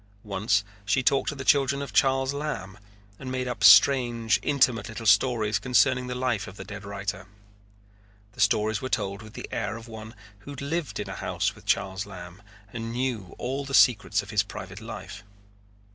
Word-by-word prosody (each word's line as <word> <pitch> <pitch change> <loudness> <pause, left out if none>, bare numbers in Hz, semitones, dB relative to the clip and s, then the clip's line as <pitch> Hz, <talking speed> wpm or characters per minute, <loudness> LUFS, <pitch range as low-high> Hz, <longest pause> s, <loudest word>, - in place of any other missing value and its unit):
Once 105 0 0 0.2
she 110 +6 +1
talked 135 +2 +2
to 150 - -4
the 135 -1 -7
children 140 -2 +3
of 140 - -6
Charles 135 0 +2
Lamb 105 -10 -5 0.4
and 130 -1 -6
made 130 0 -2
up 125 - -4
strange, 120 -4 +6
intimate 125 -7 +1
little 115 0 -7
stories 105 0 +3
concerning 125 0 +2
the 125 - -4
life 120 -6 -1
of 95 - -11
the - - -7
dead 105 0 -9
writer. 95 -2 -5 1.1
The - - -6
stories 110 0 +2
were 130 - -4
told 100 -3 -2
with 110 0 -12
the - - -7
air 110 - -3
of 115 0 -11
one 110 0 -10 0.2
who 100 - -13
had 140 -2 -7
lived 160 +2 -3
in - - -4
a - - -5
house - - -1
with - - -18
Charles 95 +1 0
Lamb 90 -1 -10 0.3
and 115 -1 -5
knew 120 -7 -3
all 135 +3 -3
the 135 0 -2
secrets 105 -4 +4
of 100 - -10
his 105 -3 +3
private 100 0 -8
life. 105 -2 -8
115 Hz, 190 wpm, -26 LUFS, 100-130 Hz, 1.1 s, strange